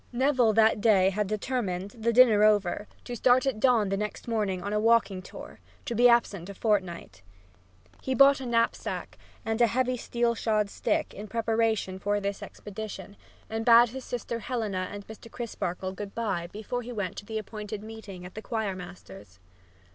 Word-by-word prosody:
Neville 250 -3 +3
that 220 -1 +4
day 195 -4 +4
had 210 +1 -1
determined, 205 -3 -2
the 230 +1 -1
dinner 230 -3 +6
over, 210 -1 +2 0.2
to 245 - -6
start 250 +2 +4
at 265 -5 -1
dawn 235 -4 +3
next 210 +3 -3
morning 205 -6 -1
on 200 +1 -3
a 210 - +2
walking 215 -4 +3
tour, - - -11 0.3
to - - -3
be 245 +2 +6
absent 200 -6 +2
a 200 - -8
fortnight. 185 - -1 0.8
He 265 - -2
bought 275 +2 +6
a 260 - -5
knapsack 230 -1 -1 0.3
and 225 +1 -1
a 235 - +6
heavy 255 +2 0
steel 235 0 0
shod 215 -3 0
stick - - -1
in 210 +2 -8
preparation 225 -3 0
for 205 +1 0
this 200 0 -3
expedition, 205 -1 -8 0.3
and 225 0 -3
bade 235 0 +7
his 260 +2 -7
sister 235 -1 -4
Helena 215 -7 -3
and 205 0 -8
Mr. 220 +1 -11
Crisparkle 190 -6 -4
good 195 +1 -8
by 205 -7 -2
before 215 +6 -5
he 245 +1 -8
went 205 -6 -3
to - - -7
the 220 -1 -3
appointed 210 -1 -6
meeting 215 -5 -9
at 180 - -10
the 215 - -7
choir 220 -4 -2
master's. 95 - -11
215 Hz, 180 wpm, -28 LUFS, 195-235 Hz, 0.8 s, bade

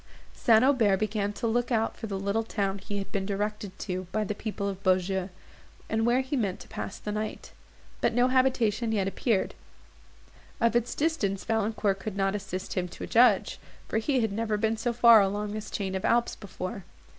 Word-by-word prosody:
St. 225 -1 +4
Aubert 230 -8 +4
began 205 0 -1
to 220 - -4
look 240 +2 0
out 225 -1 +1
for 225 - -6
the 195 -2 -3
little 200 +3 0
town 200 -3 -2
he 200 +1 -5
had 195 - -5
been 195 - -1
directed 205 0 -3
to 185 -2 -4
by 215 - 0
the 210 - -2
people 205 -1 -4
of 195 -1 -4
Beaujeu, 185 0 +1 0.6
and 225 +1 +1
where 245 +2 +3
he 265 +2 -3
meant 200 -8 -1
to - - -12
pass 195 - -6
the 210 - -5
night; 215 +1 -4 0.5
but - - +3
no 245 +1 +4
habitation 245 -4 +2
yet 200 -3 +1
appeared. 200 +1 0 1.1
Of 230 0 +2
its 240 0 +1
distance 255 -12 0
Valancourt 215 -3 0
could 200 0 -5
not 195 0 +1
assist 195 -2 -4
him 180 -1 -1
to 175 - -8
judge, 245 +2 +4 0.3
for - - 0
he 260 +2 +1
had 220 -2 0
never 215 0 -1
been 220 +1 +1
so 230 +2 -1
far 235 -2 +7
along 205 +1 -1
this 215 0 -5
chain 195 -2 -3
of 190 - -3
Alps 235 0 +2
before. 190 -1 -6
210 Hz, 195 wpm, -28 LUFS, 195-230 Hz, 1.1 s, far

